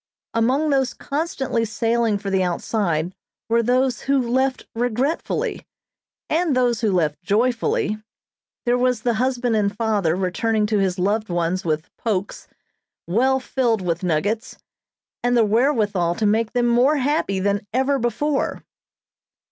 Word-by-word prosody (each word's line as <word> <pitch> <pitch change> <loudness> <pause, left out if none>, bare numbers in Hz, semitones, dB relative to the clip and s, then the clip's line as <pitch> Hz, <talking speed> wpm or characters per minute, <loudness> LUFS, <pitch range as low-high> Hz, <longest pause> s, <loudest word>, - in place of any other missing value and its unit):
Among 260 +7 +2
those 270 -2 +1
constantly 275 -6 -2
sailing 230 0 0
for 200 -1 -5
the 190 -1 +2
outside 175 -2 -1 0.3
were 230 +1 +3
those 250 +2 +1
who 275 0 +1
left 260 +2 0
regretfully, 245 +6 -1 0.6
and 320 -3 +1
those 245 -3 +1
who 220 -3 +2
left 160 -4 0
joyfully; 215 +1 0 0.6
there 245 0 +2
was 250 -2 +1
the 240 - +2
husband 250 -2 0
and 205 -1 0
father 210 -8 +1
returning 210 +4 0
to 210 -1 +1
his 190 -1 0
loved 205 +4 0
ones 175 +1 -1
with 155 -1 -3
"pokes," 200 -4 -3 0.6
well 260 +9 +2
filled 240 -6 0
with 170 -1 -1
nuggets, 185 +6 -1 0.6
and 245 0 +2
the 230 - +5
wherewithal 210 - +1
to 215 - -1
make 220 +2 +1
them 245 -1 +2
more 245 +5 +4
happy 270 -8 0
than 200 +2 -1
ever 265 +3 +1
before. 255 +5 -1
225 Hz, 140 wpm, -22 LUFS, 200-255 Hz, 0.6 s, the